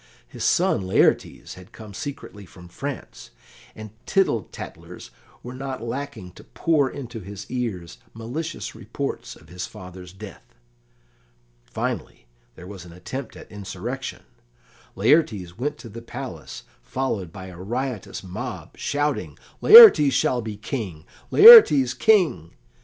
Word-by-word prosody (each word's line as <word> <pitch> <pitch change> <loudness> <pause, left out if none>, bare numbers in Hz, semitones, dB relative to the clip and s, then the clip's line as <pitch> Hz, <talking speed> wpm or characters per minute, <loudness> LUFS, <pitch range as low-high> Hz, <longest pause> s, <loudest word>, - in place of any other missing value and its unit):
His - - -8
son - - +1
Laertes 95 - 0
had 90 +4 -15
come 110 -3 -12
secretly 135 -5 -8
from 90 +1 -15
France, 140 +7 -8 0.5
and 110 -1 -10 0.2
tittle 190 - 0
tattlers - - -11 0.3
were 125 - -8
not 130 -2 -6
lacking 120 -6 -6
to - - -16
pour 150 -5 0
into 120 -5 -8
his 100 0 -9
ears 105 -9 -5 0.2
malicious 140 +9 -6
reports - - -6
of - - -20
his 90 +1 -6
father's 90 -3 -12
death. 95 -8 -13 1.1
Finally, - - -5 0.3
there 90 - -12
was 95 -2 -10
an 90 - -14
attempt 115 +9 -8
at - - -14
insurrection. 105 +6 -7 0.7
Laertes 105 - +1
went 145 +4 -3
to - - -12
the 115 +1 -10
palace, 115 - -9 0.2
followed 105 - -4
by 95 +1 -10
a 90 -2 -11
riotous 120 +3 -5
mob, 95 -1 -8
shouting, 145 +1 -2 0.2
"Laertes 420 - +9
shall 125 -1 +1
be 110 -2 -7
King! 105 - -6 0.2
Laertes 400 - +9
King!" 155 - +1
115 Hz, 130 wpm, -23 LUFS, 95-135 Hz, 1.1 s, Laertes